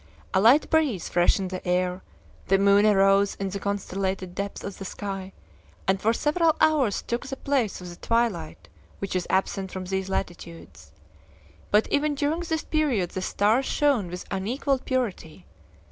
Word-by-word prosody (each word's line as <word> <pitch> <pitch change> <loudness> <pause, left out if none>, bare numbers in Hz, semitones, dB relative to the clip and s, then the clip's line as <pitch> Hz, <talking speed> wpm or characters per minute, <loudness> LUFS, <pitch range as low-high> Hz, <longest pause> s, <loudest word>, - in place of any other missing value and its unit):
A 190 - +3
light 245 +8 +6
breeze 295 - +1
freshened 180 +2 +2
the 185 - -5
air; 180 +1 0 0.5
the 195 - +4
moon 200 +1 +5
arose 195 0 +4
in 195 0 -3
the 200 - -4
constellated 190 -2 -3
depths 200 +2 -5
of 200 - -7
the - - -5
sky, 195 0 -5 0.6
and 190 0 +2
for 220 - +3
several 310 +6 +2
hours 285 -10 +2
took 235 +2 -3
the 270 - -4
place 265 -9 0
of 180 - -8
the 175 - -9
twilight 230 -9 -1 0.3
which 195 -1 -4
is 180 - -1
absent 190 0 0
from 185 -1 -5
these 190 +1 -2
latitudes. 170 -3 -6 0.8
But 210 +1 +3
even 290 0 +1
during 295 +3 0
this 320 -2 -2
period 265 - 0
the 185 - -4
stars 215 +7 +1
shone 280 -10 +2
with 180 +1 -7
unequaled 255 +7 -1
purity. 200 - -3
200 Hz, 160 wpm, -25 LUFS, 190-260 Hz, 0.8 s, light